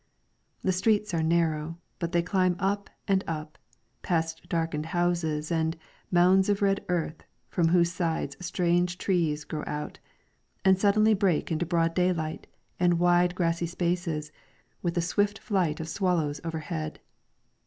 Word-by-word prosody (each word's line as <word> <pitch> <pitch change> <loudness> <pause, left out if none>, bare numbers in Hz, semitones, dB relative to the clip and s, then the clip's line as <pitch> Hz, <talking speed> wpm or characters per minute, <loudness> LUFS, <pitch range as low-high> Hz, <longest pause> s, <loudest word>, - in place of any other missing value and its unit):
The 190 - +2
streets 210 +1 +1
are 165 - +1
narrow, 160 -1 +1 0.2
but 170 -1 -2
they 170 -2 +2
climb 185 0 +2
up 200 +2 -1 0.2
and 190 -1 +2
up, 155 -1 -5 0.4
past 165 -2 -2
darkened 165 -2 -1
houses 170 -3 0
and 160 0 0 0.2
* - - -30
mounds 185 +2 +5
of 205 0 +1
red 195 0 +2
earth 165 -3 -1 0.3
from 170 -2 +2
whose 170 0 +3
sides 165 -6 -2
strange 175 0 +1
trees 165 -6 0
grow 155 -1 -5
out,"* 150 0 -5 0.7
and 190 -1 +5
suddenly 215 +2 +4
break 190 -7 +1
into 165 +1 0
broad 165 -1 +1
daylight, 170 -3 -1 0.3
and 175 -1 +3
wide 175 +1 +3
grassy 170 -1 0
spaces, 170 -3 -2 0.5
with 170 -1 -1
the 175 - +2
swift 205 +4 +1
flight 180 -9 0
of 160 - -4
swallows 165 -5 0
overhead. 155 - -4
175 Hz, 145 wpm, -28 LUFS, 160-185 Hz, 0.7 s, mounds